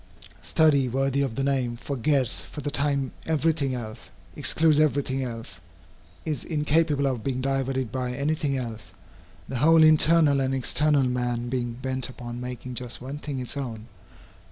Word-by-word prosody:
Study, 140 -5 +3
worthy 135 +2 0
of 135 -5 -1
the 135 - -1
name, 130 -4 0
forgets 130 - 0
for 95 - -9
the 145 - -3
time 140 -2 0 0.2
every 160 0 +2
thing 140 -4 -2
else, 110 -2 -7 0.3
excludes 155 - +3
every 145 -2 +3
thing 135 0 -2
else, 115 -8 -6 0.7
is 150 -6 -2
incapable 150 -2 +1
of 130 -5 -1
being 130 -2 -1
diverted 135 -2 -1
by 125 -1 -2
any 140 +3 0
thing 145 -3 -1
else, 115 -5 -6 0.5
the 130 - -4
whole 160 +5 +6
internal 155 -2 +5
and 135 0 0
external 145 +2 +2
man 125 -1 -1
being 120 -2 -2
bent 130 +1 -3
upon 120 -1 -7
making 125 0 -6
just 125 -1 -5
one 135 +4 -6
thing 145 -2 -5
its 125 +2 -3
own. 115 -6 -5
135 Hz, 165 wpm, -26 LUFS, 125-145 Hz, 0.7 s, whole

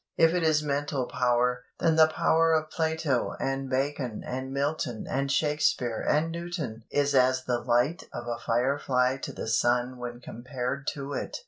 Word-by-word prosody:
If 165 0 +5
it 180 - +1
is 155 -2 +3
mental 140 -2 -1
power, 125 0 +1 0.2
then 165 -1 +3
the 160 0 +7
power 165 +1 +3
of 155 -1 0
Plato 160 -5 0
and 135 0 -2
Bacon 130 -3 -2
and 130 +1 -4
Milton 140 -4 -2
and 140 +1 -1
Shakespeare 150 -6 +1
and 155 +2 +1
Newton 165 -10 -5
is 145 0 +1
as 130 -1 +3
the 125 -1 0
light 125 +9 +1
of - - -6
a 120 0 -3
fire 125 +5 +1
fly 125 -1 +1
to - - -6
the - - -6
sun 125 +2 +1
when 120 0 -6
compared 125 +3 -5
to 140 0 -5
it. - - -4
135 Hz, 175 wpm, -28 LUFS, 125-150 Hz, 0.2 s, the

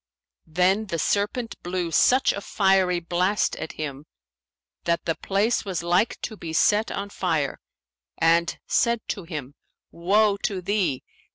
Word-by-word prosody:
Then 185 +6 +2
the 170 - -2
serpent 210 +7 -1
blew 175 -1 -3
such 260 +9 +4
a 200 - -5
fiery 190 -3 +2
blast 180 +4 0
at - - -6
him, 145 -1 -6 0.8
that 170 0 0
the 165 - +1
place 205 +7 0
was 185 -5 -3
like 180 +6 +1
to 220 - -5
be 165 -5 -7
set 210 +6 +3
on 200 0 -5
fire, 160 -8 -1 0.6
and 165 +1 +2
said 235 -2 +1
to 195 - -4
him, 150 -5 -6 0.4
Woe 200 +4 +2
to 200 -1 -2
thee! 180 -7 -1
185 Hz, 145 wpm, -24 LUFS, 165-205 Hz, 0.8 s, such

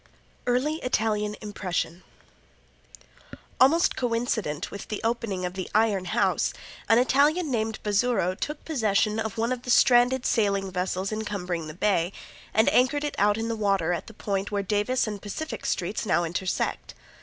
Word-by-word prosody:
Early 260 +6 +1
Italian 215 -6 0
Impression 185 -4 -3 1.6
Almost 315 +6 +4
coincident 230 - -1
with 200 - -7
the 210 - -4
opening 225 -5 -1
of 180 - -3
the 185 -1 -5
Iron 210 -4 +2
House - - +1 0.4
an 225 - +6
Italian 285 +6 +3
named 220 -2 -1
Bazzuro 205 -3 +1
took 295 +10 -5
possession 220 -6 +1
of 220 -1 -3
one 230 +2 0
of 250 -1 -2
the 250 - -9
stranded 245 +1 +5
sailing 200 -4 +1
vessels 185 +1 -2
encumbering 185 -6 -3
the 155 - -8
Bay, 185 -3 +1 0.4
and 220 +1 +3
anchored 285 +4 +3
it 295 - -2
out 205 +1 +3
in 225 0 -2
the 230 - -1
water 195 -5 +1
at 170 - -4
the 225 - -12
point 200 -1 -2
where 205 -1 -1
Davis 210 +6 +1
and 210 -2 -5
Pacific 310 +10 -5
streets 190 +4 -1
now 175 -5 +2
intersect. 175 +3 -2
210 Hz, 155 wpm, -26 LUFS, 195-245 Hz, 1.6 s, an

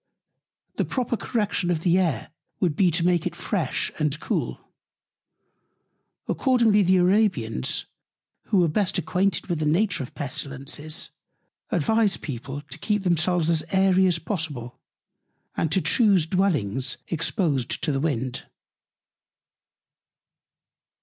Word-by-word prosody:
The - - +1
proper 245 -2 -1
Correction 210 -6 -1
of 165 -3 0
the 175 +1 +3
Air 160 -12 -1 0.3
would 170 -5 +1
be 185 +1 +4
to 170 +1 0
make 175 -2 +2
it - - -5
fresh - - -1
and 150 0 0
cool. - - -2 1.7
Accordingly 235 -6 +3
the 185 0 +4
Arabians, 180 - +1 0.6
who 200 - +1
were 175 -2 +4
best 185 +5 0
acquainted 185 -1 0
with 170 -4 -2
the 155 - 0
Nature 175 +1 +2
of 130 - -8
Pestilences, 145 +3 -4 0.6
advise 220 -3 +2
People 135 +1 -6
to 145 +1 -11
keep 210 +4 0
themselves 175 -1 +1
as 160 -2 +2
airy 190 -1 +4
as 175 -2 +2
possible, 160 - -4 0.8
and 160 - 0
to 190 - +2
chuse 200 -8 +3
Dwellings 150 - 0
exposed 155 - -1
to - - +1
the 135 - 0
Wind. 130 -5 -2
170 Hz, 125 wpm, -25 LUFS, 150-195 Hz, 1.7 s, be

